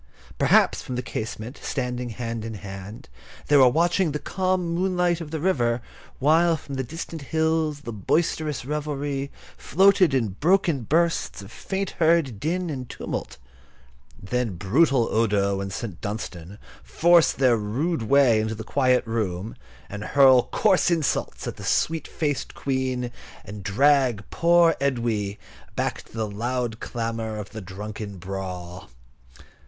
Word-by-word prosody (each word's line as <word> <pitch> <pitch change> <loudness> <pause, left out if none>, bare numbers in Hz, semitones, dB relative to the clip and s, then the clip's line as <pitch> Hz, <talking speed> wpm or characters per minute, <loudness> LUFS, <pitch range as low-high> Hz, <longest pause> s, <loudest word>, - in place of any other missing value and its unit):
Perhaps, - - +4
from 125 - -5
the 125 - -3
casement, 110 +3 -5
standing 125 -2 -3
hand 115 -1 -4
in 110 0 -5
hand, 100 +2 -9 0.4
they 145 - +6
were 130 -2 +7
watching 170 +3 +2
the - - 0
calm 185 +3 -1
moonlight 180 -1 +1
on 165 - -5
the 160 +1 -4
river, 125 -9 +1 0.4
while 160 +4 +3
from 140 -1 -10
the 130 -1 -2
distant 160 +1 -7
halls 160 -2 0
the 115 -5 -6
boisterous 150 - -1
revelry 145 -1 -3 0.3
floated 190 -4 +4
in 115 -5 +1
broken 165 - +2
bursts 165 -3 0
of 100 - -12
faint 195 0 -3
heard 160 -9 +3
din 175 - -1
and 130 -4 -6
tumult. - - -5 0.8
Then 115 0 -2
brutal 120 - +3
Odo 100 -3 +1
and 95 0 -4
St. 95 -3 -6
Dunstan 100 -3 -6 0.2
force 170 0 +4
their 130 -3 +3
rude 120 +9 -1
way 120 -1 +4
into 110 +1 -2
the 110 - -7
quiet 130 +1 +2
room, 110 -3 -3 0.3
and 105 +1 -7
hurl 130 0 +5
coarse 190 -4 +3
insults 165 -5 -1
at - - -5
the - - -9
sweet 160 0 0
faced 145 -4 -3
Queen, 130 -2 -2 0.3
and 100 +1 -8
drag 125 +1 +2
poor 170 -1 +4
Edwy 115 -7 -1 0.4
back - - -2
to - - -22
the 110 -1 -2
loud 120 +2 -3
clamour 115 -2 -4
of 105 -2 -7
the 110 +1 -7
drunken 100 +2 -7
brawl. 90 -3 -6
125 Hz, 145 wpm, -24 LUFS, 110-160 Hz, 0.8 s, were